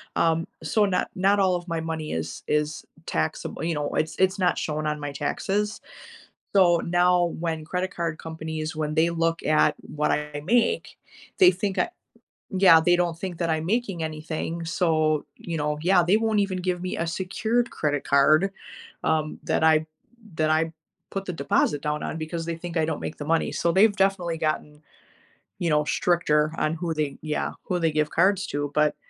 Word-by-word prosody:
um, 165 0 +2 0.2
so, 205 +7 +2
not 190 -2 0
not 195 +2 +3
all 190 -2 +3
of 175 0 -5
my 165 -1 -2
money 160 -1 -4
is 80 0 -4
is 150 0 -1 0.2
taxable, - - -2
you 165 0 0
know, 150 0 -2
it's 155 +1 -1
it's 190 +1 +2
not 180 -2 +2
shown 155 0 -2
on 150 0 -2
my 145 -1 -4
taxes, 200 +9 -2 0.8
so 175 -3 +6
now 175 +1 +3
when 165 -2 -2
credit 180 +3 -3
card 165 -2 -2
companies, 160 -1 -5
when 155 -1 -2
they 165 +2 +3
look 165 0 0
at 155 -1 +3 0.2
what 150 0 +1
I 150 0 -2
make, 240 - +1 0.4
they 370 -2 +8
think 200 -3 -3
I 355 - +1 0.6
Yeah, 185 -4 +7
they 175 +2 +4
don't 175 -2 0
think 180 -1 -5
that 170 -2 0
I'm 160 0 0
making 195 -4 -1
anything, 160 +2 -4
so, 155 -3 +1
you 170 - -5
know, 150 0 -1
yeah, 180 +1 +4
they 185 +5 +4
won't 220 -1 +1
even 195 -2 -1
give 180 -1 -2
me 185 - -3
a 165 - -1
secured 220 +7 -1
credit 145 -2 -1
card, 155 +7 +4 0.5
um, 155 -1 0
that - - 0
I 160 0 +4 0.5
that 155 0 +1
I 160 +1 +1 0.4
put 195 - -3
the 180 - -4
deposit 145 -1 +1
down 150 0 -2
on - - -4
because 165 +1 -4
they 170 0 -3
think 175 0 -7
I 160 - +2
don't 160 -1 -3
make - - -5
the 145 - -6
money. 165 +2 +1
So 170 - +1
they've 205 +4 +4
definitely 190 -4 +1
gotten, 155 -1 -3 0.8
you 170 - 0
know, 150 -1 +3
stricter 150 -3 +2
on 155 +1 0
who 165 0 -2
they 150 -3 -2
Yeah, 150 0 -2
who 180 - -1
they 165 -2 +2
give 150 0 0
cards 190 +3 +2
to, 145 0 -2
but, 150 -1 +3
165 Hz, 190 wpm, -25 LUFS, 155-180 Hz, 0.8 s, they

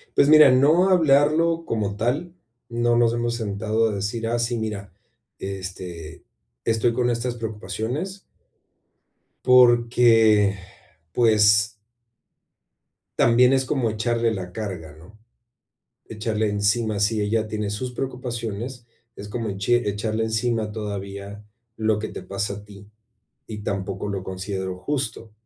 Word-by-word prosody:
Pues 140 - +4
mira, 155 -3 +8
no 155 +9 +4
hablarlo 165 0 +3
como 105 -3 -2
tal, 135 +11 -2 0.4
no 120 0 +1
nos 120 -1 +3
hemos 120 0 -1
sentado 110 0 -1
a - - -3
decir, 105 +3 -3
ah, 120 +1 0
sí, 120 0 -1
mira, 105 -4 -5 0.5
este, 95 -4 -7 0.4
estoy 115 +1 +1
con 125 0 +1
estas 120 +1 -2
preocupaciones 115 - -4 1.2
porque, 120 -4 +5 0.6
pues 105 -2 +4 1.5
también 125 +2 +5
es 130 -1 +2
como 130 -3 0
echarle 115 +1 0
la 95 -4 -5
carga, 90 -8 -6
¿no? 90 +7 -17 0.9
Echarle 110 -1 -2
encima, 105 +1 0
si 105 +1 +1
ella 110 +1 0
tiene 105 -1 -3
sus 115 +5 -4
preocupaciones, 120 -2 -5 0.3
es 105 - -8
como 115 +1 -4
eche 105 +5 +1
echarle 110 +2 -2
encima 110 0 -1
todavía 100 -1 -6 0.3
lo 110 -1 +1
que 110 - -3
te - - -8
pasa 100 +2 -3
a 105 0 -10
ti, 100 -1 -14 0.6
y 110 - -7
tampoco 95 0 -3
lo 100 -2 -3
considero 95 0 -5
justo. 115 -1 -4
110 Hz, 125 wpm, -23 LUFS, 100-120 Hz, 1.5 s, mira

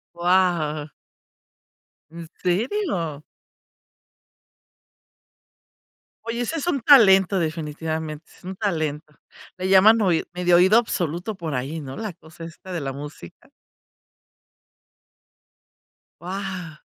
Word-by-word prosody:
Guau. 170 -4 +1 1.2
¿En 165 0 -9
serio? 180 - -1 3.0
Oye 230 +1 -3
ese 315 +7 -2
es 315 - -4
un 280 -7 0
talento 195 - +6
definitivamente, 160 -1 -4
es - - -23
un 190 +1 -6
talento, 155 -6 -3 0.4
le 185 +1 -3
llaman 210 +4 +6
oi 180 -5 +2
medio 180 0 +2
oído 190 +5 +6
absoluto 180 -2 -3
por 165 -5 -5
ahí, 140 +6 -4
¿no?, 135 -2 -8
la 215 -4 -5
cosa 165 0 -13
esta 170 +3 -11
de 175 -3 -3
la 135 -1 -4
música. 140 - -11 2.7
Guau. 185 -3 -6
175 Hz, 100 wpm, -23 LUFS, 155-195 Hz, 3.0 s, talento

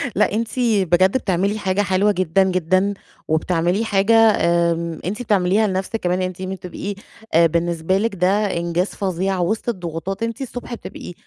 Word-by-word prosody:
لأ - - +2
أنتِ 225 +1 -1
بجد 190 -3 +3
بتعملي 200 0 -1
حاجة 190 0 0
حلوة 195 +2 +2
جدًا، 185 0 +2
جدًا 185 +2 +1 0.3
وبتعملي 175 +6 0
حاجة 205 +1 +2
آمم، 170 -6 +2
أنتِ 210 +6 -3
بتعمليها 205 -1 +2
لَنْفسك 190 +3 -2
كمان 180 +1 0
يعني 185 - 0
أنتِ 185 - -13
م 190 0 -3
تبقي 190 +2 -6 0.4
آآ، 165 +1 +6
بالنسبة 170 +2 0
لِك 210 0 -1
ده 195 +1 +1
إنجاز 170 +2 0
فظيع 190 0 -2
وسط 215 +7 -1
الضغوطات 180 +1 -4
أنتِ 230 +3 -3
الصبح 245 -1 -6
بتبقي 180 - -8
190 Hz, 160 wpm, -20 LUFS, 175-205 Hz, 0.4 s, آآ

